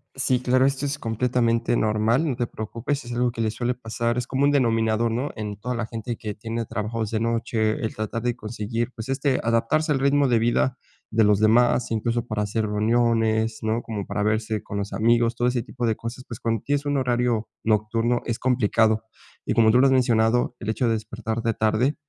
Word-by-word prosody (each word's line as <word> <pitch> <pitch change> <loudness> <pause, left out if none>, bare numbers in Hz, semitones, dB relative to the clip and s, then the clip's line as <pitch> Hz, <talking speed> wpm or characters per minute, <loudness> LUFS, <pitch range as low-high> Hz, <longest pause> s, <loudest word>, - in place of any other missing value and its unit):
Sí, 130 -1 +1
claro, 130 +1 +3
esto 135 +1 0
es 145 - -3
completamente 115 -1 0
normal, 110 +7 +1
no 135 - -1
te 120 0 -2
preocupes, 120 +6 -4
es 120 - -6
algo 120 0 +1
que 115 - -11
le 110 -1 0
suele 120 +2 -2
pasar 120 0 -2
es 125 - -1
como 135 +2 0
un 145 - +4
denominador, 115 -4 +2
¿no?, 125 +5 -1
en 105 -2 -5
toda 125 +3 -3
la 120 -1 -2
gente 115 +1 -5
que 105 -1 -5
tiene 115 +2 -4
trabajos 110 +1 -3
de 110 - 0
noche, 115 -1 0
el 110 - -2
tratar 110 +2 -4
de 120 -1 0
conseguir, 115 +1 -4
pues, 110 +2 -7
este, 135 0 +1
adaptarse 115 +8 +1
al 135 - +2
ritmo 140 +1 +3
de 120 -3 +3
vida 120 +3 +1 0.3
de 110 0 +3
los 105 -1 +4
demás, 120 +3 +3
incluso 115 +1 -1
para 110 -3 -2
hacer 110 +2 -1
reuniones, 110 +1 +1
¿no?, 110 +2 -1
como 105 -4 -5
para 105 - -2
verse 110 0 -1
con 100 - -6
los 100 +1 -4
amigos. 115 +1 +2
Todo 120 +1 +1
ese 125 -1 -1
tipo 120 +1 -5
de 110 -1 +1
cosas, 115 +3 -7
pues, 115 - -7
cuando 115 -2 -1
tienes 145 0 -1
un 145 - +1
horario 120 -3 0 0.2
nocturno, 115 +2 +1
es 115 - -2
complicado. 110 -3 +2 0.4
Y - - 0
como 110 -1 +5
tú 125 - +4
lo 135 - +5
has 135 - +4
mencionado, 120 -1 +2
el 110 - -5
hecho 115 +2 0
de 115 - +2
despertar 110 +1 -4
de 115 - +1
tarde, 110 +7 +1
115 Hz, 215 wpm, -24 LUFS, 110-125 Hz, 0.4 s, como